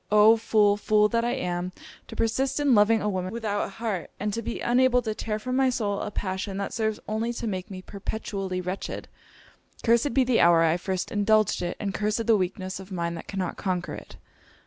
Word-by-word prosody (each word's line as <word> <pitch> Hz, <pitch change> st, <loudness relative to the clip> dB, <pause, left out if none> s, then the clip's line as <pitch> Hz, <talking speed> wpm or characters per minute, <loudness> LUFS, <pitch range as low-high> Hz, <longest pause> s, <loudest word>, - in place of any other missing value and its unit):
Oh! 210 Hz, +2 st, +7 dB
fool, 215 Hz, -2 st, +3 dB
fool 210 Hz, 0 st, +3 dB
that 230 Hz, 0 st, +1 dB
I 240 Hz, -, 0 dB
am, 180 Hz, 0 st, -3 dB, 0.3 s
to -, -, -9 dB
persist 265 Hz, +5 st, 0 dB
in 285 Hz, -3 st, +3 dB
loving 215 Hz, 0 st, +4 dB
a -, -, 0 dB
woman 185 Hz, -2 st, -2 dB
without 215 Hz, -3 st, -1 dB
an -, -, -7 dB
heart, 200 Hz, -4 st, -4 dB
and 205 Hz, +1 st, -2 dB
to 230 Hz, -, -2 dB
be 235 Hz, -, -4 dB
unable 250 Hz, 0 st, +3 dB
to 220 Hz, -1 st, -2 dB
tear 215 Hz, 0 st, -3 dB
from 255 Hz, +4 st, -3 dB
my 265 Hz, 0 st, +4 dB
soul 205 Hz, -5 st, -1 dB
a -, -, -3 dB
passion 190 Hz, -1 st, -3 dB
that 200 Hz, -, -3 dB
serves 220 Hz, -2 st, -1 dB
only 220 Hz, +2 st, -1 dB
to 235 Hz, -, -5 dB
make 185 Hz, -4 st, -3 dB
me 185 Hz, -2 st, -8 dB
perpetually 195 Hz, -2 st, -4 dB
wretched. 180 Hz, +2 st, -5 dB, 0.8 s
Cursed 235 Hz, +4 st, +3 dB
be 265 Hz, -, +5 dB
the 250 Hz, -2 st, +2 dB
hour 170 Hz, -1 st, +6 dB
I 165 Hz, +1 st, +3 dB
first 185 Hz, 0 st, -3 dB
indulged 215 Hz, -1 st, +2 dB
it, 175 Hz, -1 st, -3 dB
and 200 Hz, -2 st, -2 dB
cursed 215 Hz, +3 st, -1 dB
the 225 Hz, -, +5 dB
weakness 185 Hz, 0 st, -2 dB
of 190 Hz, +1 st, -11 dB
mind 170 Hz, -2 st, -2 dB
that 165 Hz, -, -8 dB
cannot 190 Hz, -2 st, -3 dB
conquer 180 Hz, -3 st, -2 dB
it!' -, -, -10 dB
210 Hz, 215 wpm, -26 LUFS, 185-230 Hz, 0.8 s, Oh